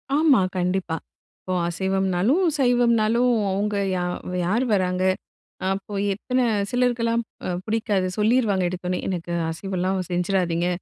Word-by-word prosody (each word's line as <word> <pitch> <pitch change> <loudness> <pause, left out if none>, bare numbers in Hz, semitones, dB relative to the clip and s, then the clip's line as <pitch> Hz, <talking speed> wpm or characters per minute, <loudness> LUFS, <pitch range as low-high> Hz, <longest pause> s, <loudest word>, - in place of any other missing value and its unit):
ஆமா 295 -7 +5 0.2
கண்டிப்பா. 180 -2 -1 0.4
இப்போ 185 - -4
அசைவம்னாலும், 190 - +1
சைவம்னாலும் 240 -1 +3 0.2
அவங்க 205 +2 -1 0.2
யா 180 - -1 0.4
யார் 220 +8 +1
வராங்க? 185 -1 +1 0.7
அப்போ 195 +1 -5 0.2
எத்தன 255 +5 -1 0.3
சிலருக்கெல்லாம் 235 -2 +1 0.2
அ - - -2 0.2
பிடிக்காது 215 -4 0
சொல்லிருவாங்க 210 -3 +2
எடுத்தோனே. 180 0 -3
எனக்கு 175 -2 -3 0.2
அசைவம்லா 185 +2 -2 0.2
செஞ்சிராதீங்க, 175 -1 0
195 Hz, 105 wpm, -23 LUFS, 180-235 Hz, 0.7 s, ஆமா